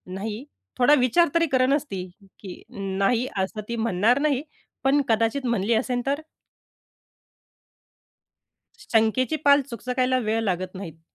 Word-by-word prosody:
नाही, 210 +4 -5 0.3
थोडा 255 +3 +5
विचार 300 +8 +3
तरी 335 - +4
करच 265 +2 +2
ती, 190 -2 -3 0.4
की 190 -3 -10 0.2
नाही, 195 +5 0
असं 190 +3 -2
ती 235 - -2
म्हणणार 225 +2 +2
नाही, 285 -3 +1 0.4
पण 275 +2 +3
कदाचित 230 +4 +1
म्हणली 235 -2 +1
असेल 245 +2 0
तर? 280 +2 -1 2.6
शंकेची 230 +6 +1
पाल 285 0 +6
चुकचकायला 250 +1 -1
वेळ 225 -1 -1
लागत 185 -2 -2
नाहीत. 165 -4 -8
235 Hz, 125 wpm, -24 LUFS, 200-260 Hz, 2.6 s, पाल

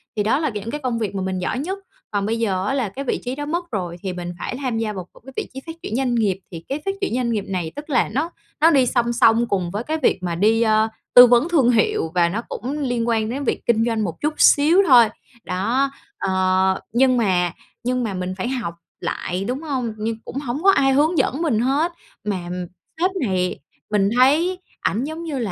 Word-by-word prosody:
thì 210 - +1
đó 220 +7 +2
là 310 - 0
những 215 -1 -5
cái 295 - -4
công 245 -3 -1
việc 210 -3 -3
mà 195 - -2
mình 185 0 -2
giỏi 185 +8 -2
nhất. 375 +7 -3 0.3
Còn 200 -1 0
bây 225 +2 -1
giờ 190 -5 0
á - - 0
là 255 -7 0
cái 270 +8 -6
vị - - -1
trí 250 +1 -3
đó 290 +1 -4
mất 345 +2 -3
rồi 180 -5 -3
thì 190 -2 -3
mình 175 -1 -5
phải 245 - -4
tham 250 -4 -1
gia 225 -1 -1
vào 185 -3 -7
một - - -17
cái 270 - -11
vị - - -3
trí 265 - -6
phát 325 - -6
triển 215 - -3
doanh 250 -1 +1
nghiệp. 200 -5 +1
Thì 165 -2 -8
cái 280 +3 -2
phát 390 - +1
triển 390 - -1
doanh 245 -2 0
nghiệp 210 -3 -1
này 180 -4 -3
tức 300 +2 -8
là 255 -4 +2
nó 285 - -1 0.3
nó 325 +2 +7
đi 270 -4 +4
song 240 -1 +1
song 230 0 +4
cùng 185 -5 -1
với 205 +4 -3
cái 310 +5 -2
việc 215 - +2
mà 175 -2 -1
đi, 220 +6 +3
ờ, 220 -1 +3 0.3
tư 245 - +11
vấn 245 +7 +4
thương 275 -8 +4
hiệu, 215 -8 +1
và 170 -1 +4
nó 210 +6 -2
cũng 255 - -4
liên 245 -4 -1
quan 220 -2 +1
đến 270 +4 -3
việc - - -2
kinh 225 -1 +3
doanh 225 -2 0
một 170 -5 -5
chút 300 +1 0
xíu 320 +7 +6
thôi. 245 -5 +8 0.4
Đó, 235 +10 0 0.3
ờ, 190 0 +1
nhưng 255 +1 +4
mà 180 -6 +2 0.3
nhưng 250 +1 0
mà 215 -4 -2
mình 185 0 -3
phải 190 - -2
học 240 -10 -3 0.3
lại, 180 +2 -3
đúng 255 +4 -2
hông? 260 -8 -2
Nhưng 220 +1 -2
cũng - - -8
hổng 280 +2 -4
có 390 - +7
ai 270 -7 +3
hướng 310 +5 +3
dẫn 285 +1 +1
mình 285 -10 +1
hết, 280 +8 +1 0.3
mà, 205 -2 -1
ừm, 180 0 -4 0.3
sếp 365 +2 +3 0.2
này, 180 -1 -1 0.3
mình 200 -2 +3
thấy 310 +9 +4 0.2
ảnh 225 +5 0
giống 315 +3 -5
như 310 -4 -4
là 220 -5 -2
235 Hz, 245 wpm, -21 LUFS, 195-275 Hz, 0.4 s, tư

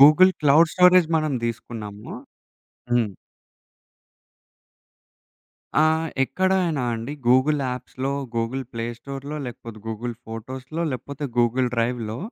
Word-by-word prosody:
Google 155 +7 +8
cloud 155 +2 +5
storage 180 -2 +6
మనం 155 -2 0
దీసుకున్నాము. 110 -3 -5 0.8
హ్మ్. 115 -5 +2 2.7
ఆ! - - +5 0.4
ఎక్కడైనా 175 -1 +1
అండి, 115 +5 -4
గూగుల్ 130 +4 +4
యాప్స్‌లో, 125 +2 -3 0.2
గూగుల్ 115 +3 -1
ప్లే 115 0 -3
స్టోర్‌లో 140 +3 -6
లేకపోతే 115 -2 -8
గూగుల్ 115 +2 -4
ఫోటోస్‌లో 130 +8 -5
లేకపోతే 140 +4 -5
గూగుల్ 125 +2 +3
డ్రైవ్‌లో 115 -1 -1
130 Hz, 95 wpm, -24 LUFS, 115-150 Hz, 2.7 s, గూగుల్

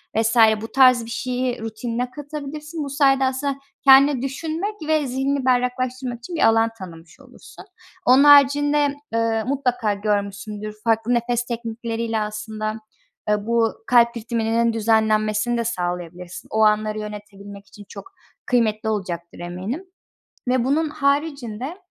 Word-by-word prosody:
vs. 225 +2 +1 0.2
bu 225 - -7
tarz 255 -3 +5
bir - - -10
şeyi 250 +1 -2
rutinine 230 +2 -4
katabilirsin. 300 +2 -7
Bu 280 - -5
sayede 270 -1 +3
aslında 265 +1 -1 0.3
kendine 275 -1 +6
düşünmek 320 +9 -3
ve 310 -2 +1
zihni 270 +1 -1
berraklaştırmak 250 0 -1
için 335 +9 -8
bir - - +4
alan 225 0 +3
tanımış 170 +2 -12
olursun. 260 -2 -15 0.4
Onun 260 +3 +6
haricinde, 290 0 +5 0.2
ııı, 225 -1 0
mutlaka 250 -5 0
görmüşsündür, 205 +1 -3
farklı 225 +1 +1
nefes 240 0 0
teknikleriyle 230 -1 -3
aslında, 215 0 -4 0.6
ııı, 210 -1 0
bu 230 -1 +2
kalp 235 -1 +4
ritminin 230 0 0
düzenlenmesini 220 +1 +1
de 235 - 0
sağlayabilirsin. 180 -3 -5
O 220 - +1
anları 215 0 +2
yönetebilmek 205 -1 -9
için 205 +1 -14
çok 390 - -11 0.3
kıymetli 220 -3 +1
olacaktır 175 -5 -4
eminim 185 - -5 0.6
ve 250 -1 +2
bunun 300 +5 +1
haricinde, 280 - -2
235 Hz, 130 wpm, -22 LUFS, 215-270 Hz, 0.6 s, kendine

